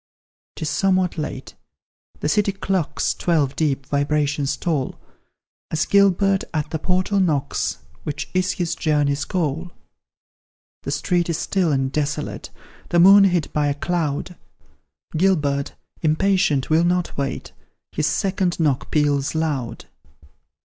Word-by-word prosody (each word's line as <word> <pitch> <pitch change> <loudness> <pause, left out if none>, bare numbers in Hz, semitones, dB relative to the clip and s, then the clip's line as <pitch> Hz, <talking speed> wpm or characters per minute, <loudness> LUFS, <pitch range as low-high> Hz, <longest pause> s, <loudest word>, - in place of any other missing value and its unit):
'Tis 155 - -4
somewhat 185 +3 +1
late 140 -3 -5 0.7
the - - 0
city 200 +6 +2
clocks 185 -7 -1
Twelve 150 -6 0
deep 140 -4 0
vibrations 145 0 0
toll, 155 -7 -2 0.7
As 160 0 0
Gilbert 195 -1 +3
at 150 -1 -2
the 160 - -2
portal 185 +4 0
knocks, 140 - 0 0.2
Which 145 - -4
is 185 0 +1
his 175 -2 -2
journey's 145 -2 0
goal. 165 -1 -2 1.1
The - - -6
street 170 +5 0
is 165 - 0
still 185 -5 0
and 135 -1 0
desolate, 150 0 -3 0.4
The 175 - +3
moon 195 +3 +8
hid 175 -5 0
by 150 -1 +1
a 140 - 0
cloud; 165 +1 -2 0.8
Gilbert, 150 -6 +1 0.3
impatient, 160 -3 +2
will 160 +2 +4
not 175 0 0
wait, 140 -1 -3 0.4
His 150 -1 0
second 190 -2 0
knock 145 -5 0
peals 145 -1 +1
loud. 140 -8 -2
155 Hz, 125 wpm, -22 LUFS, 145-180 Hz, 1.1 s, moon